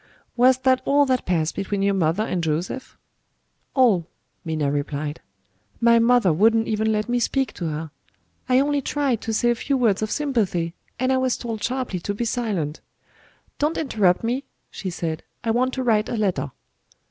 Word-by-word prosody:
'" - - -37
"Was 255 +1 +5
that 260 0 +2
all 285 +1 +4
that 255 -2 0
passed 165 -3 +1
between 195 0 -2
your 200 0 +3
mother 180 +2 +1
and 180 -6 -2
Joseph?" 165 +11 -3 0.8
"All," 215 - +4 0.4
Minna 155 -4 -1
replied. 145 +1 -3 0.6
"My 235 0 +5
mother 230 -6 +4
wouldn't 225 +6 +3
even 220 0 +1
let 215 +1 0
me 245 0 +1
speak 265 +3 0
to 175 - -5
her. 155 0 -4 0.6
I 255 0 +5
only 290 0 +1
tried 275 -4 0
to 225 - -3
say 240 +2 +2
a - - +3
few 270 +4 -1
words 220 -6 +2
of 215 - -1
sympathy 210 - 0 0.2
and 255 +2 +1
I - - +3
was 260 -1 +1
told 225 -3 -5
sharply 245 -4 -2
to 200 +4 -3
be 235 - -2
silent. 205 - -2 0.8
'Don't 300 +3 +1
interrupt 210 - +2
me,' 250 +5 -1 0.3
she 190 - -5
said, 165 -2 -3 0.2
'I 225 - +1
want 255 +3 +1
to 260 - -2
write 220 -3 +2
a 235 - -2
letter.'" 190 -8 0
225 Hz, 180 wpm, -23 LUFS, 180-255 Hz, 0.8 s, Was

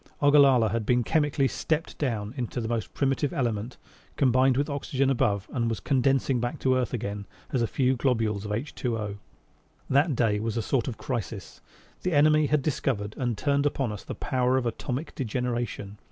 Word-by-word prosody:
Ogallala 140 -6 +5
had 115 +2 -1
been 125 +2 +2
chemically 145 0 +2
"stepped 160 +4 -2
down" 115 -6 -2
into 125 -1 -3
the 115 - -3
most 115 -1 -2
primitive 135 +1 +1
element, 120 -2 -2 0.4
combined 130 -1 +3
with 140 - +2
the 145 - -4
oxygen 135 -1 0
above 105 -6 +1
and 115 -4 0
was 115 - -2
condensing 135 -1 +1
back 120 +1 -2
to 130 - +2
earth 130 -1 0
again 100 -4 -4 0.3
as 130 - +2
a 115 - +2
few 130 +2 +1
globules 115 -5 0
of 105 +5 -2 0.2
HO. 110 -4 -2 0.7
That 140 +2 +3
day 110 -3 +2
was 115 +1 -2
a 115 - 0
sort 125 -1 0
of 120 - -4
crisis; 110 -7 -5 0.4
the 180 - -1
enemy 155 +1 +5
had 150 -2 +1
discovered 110 -8 -1
and 120 -4 -2
turned 140 +2 +2
upon 135 -5 -1
us 105 - -7
the - - -6
power 130 -1 +1
of 130 - -1
atomic 125 +5 -3
degeneration! 120 -5 -3
125 Hz, 180 wpm, -27 LUFS, 110-135 Hz, 0.7 s, Ogallala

